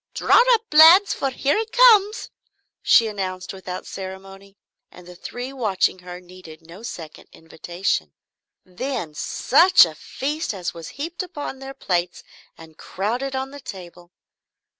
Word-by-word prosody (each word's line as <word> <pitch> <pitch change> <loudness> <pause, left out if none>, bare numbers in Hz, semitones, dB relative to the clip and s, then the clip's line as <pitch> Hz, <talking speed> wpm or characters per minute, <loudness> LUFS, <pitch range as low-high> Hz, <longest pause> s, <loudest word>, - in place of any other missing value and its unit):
Draw 470 - +4
up, 450 - -4
lads, 330 +6 +7
for 275 - -2
here 275 +7 -1
it 445 0 -5
comes!" 445 -4 +4 0.5
she 230 - +4
announced 185 -4 -5
without 185 -1 -8
ceremony, 195 +1 -10 0.3
and 180 -1 -16
the 180 - -11
three 245 +8 -8
watching 200 -7 -1
her 180 0 -10
needed 180 -3 -15
no 170 +5 -13
second 165 -9 -10
invitation. 165 - -4 0.5
Then 185 - -5
such 320 - +4
a 165 - -8
feast 285 - -5
as 180 -3 -5
was 165 -2 -10
heaped 330 +6 -5
upon 290 -7 -7
their 270 0 -9
plates 175 -1 -3 0.3
and 160 -1 -16
crowded 245 +8 -4
on 265 +1 -4
the 285 - -10
table. 175 -6 -11
195 Hz, 140 wpm, -21 LUFS, 180-275 Hz, 0.5 s, lads